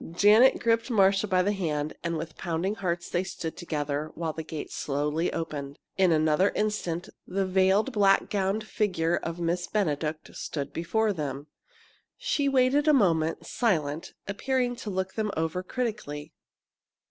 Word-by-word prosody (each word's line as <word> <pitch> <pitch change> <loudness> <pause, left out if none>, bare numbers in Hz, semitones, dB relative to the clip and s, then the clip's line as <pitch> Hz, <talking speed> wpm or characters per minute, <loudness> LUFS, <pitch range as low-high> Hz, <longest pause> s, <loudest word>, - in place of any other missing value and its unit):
Janet 210 +8 +6
gripped 230 +1 +1
Marcia 195 -2 +4
by 185 -2 +3
the 205 - +1
hand, 155 -6 -2
and 170 -1 -1
with 160 0 -6
pounding 175 +3 -1
hearts 175 -4 -2
they 175 +1 0
stood 165 -3 -5
together, 150 -3 -3
while 165 -1 -2
the 160 - -4
gate 155 -1 -6
slowly 150 +4 -1
opened. 145 -3 -4 0.2
In 190 -2 +4
another 155 +4 +3
instant, 200 -5 -1 0.2
the 195 +1 0
veiled, 190 +6 +3
black 200 -4 +4
gowned 200 +1 0
figure 175 -6 0
of 165 +1 -5
Miss 175 +1 -1
Benedict 155 -6 -2
stood 140 -3 -4
before 215 +6 +1
them. 145 -4 -4 0.7
She 400 - 0
waited 275 +3 +3
a 305 - +6
moment, 165 - +2
silent, 160 -9 -1
appearing 245 +4 0
to 230 - -6
look 190 -1 -2
them 215 -1 -1
over 160 +3 -1
critically. 205 - -4
180 Hz, 150 wpm, -27 LUFS, 160-210 Hz, 0.7 s, Janet